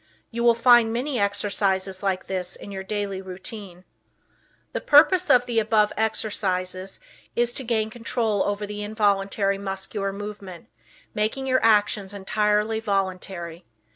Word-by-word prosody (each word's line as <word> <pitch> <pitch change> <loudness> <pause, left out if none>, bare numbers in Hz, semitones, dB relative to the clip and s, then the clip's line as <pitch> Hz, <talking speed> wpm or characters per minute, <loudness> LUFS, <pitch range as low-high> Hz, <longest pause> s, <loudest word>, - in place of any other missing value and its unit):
You 235 0 -3
will 235 -1 +5
find 235 -1 +5
many 250 +2 -2
exercises 195 -2 0
like 190 -2 -1
this 185 -1 -3
in 200 - -10
your 190 -1 -5
daily 195 -1 -3
routine. 190 0 -8 0.9
The - - -2
purpose 350 +5 +5
of 245 0 +5
the 235 -2 +1
above 215 -1 +2
exercises 190 -4 -2 0.4
is 240 0 +1
to 265 - -2
gain 220 -2 -1
control 230 -3 -1
over 205 0 -1
the 210 0 -6
involuntary 200 -1 0
muscular 195 0 -4
movement, 200 -3 -8 0.4
making 220 +6 -1
your 260 -1 +1
actions 205 -2 +2
entirely 210 +2 0
voluntary. 185 -4 -3
205 Hz, 135 wpm, -24 LUFS, 195-225 Hz, 0.9 s, will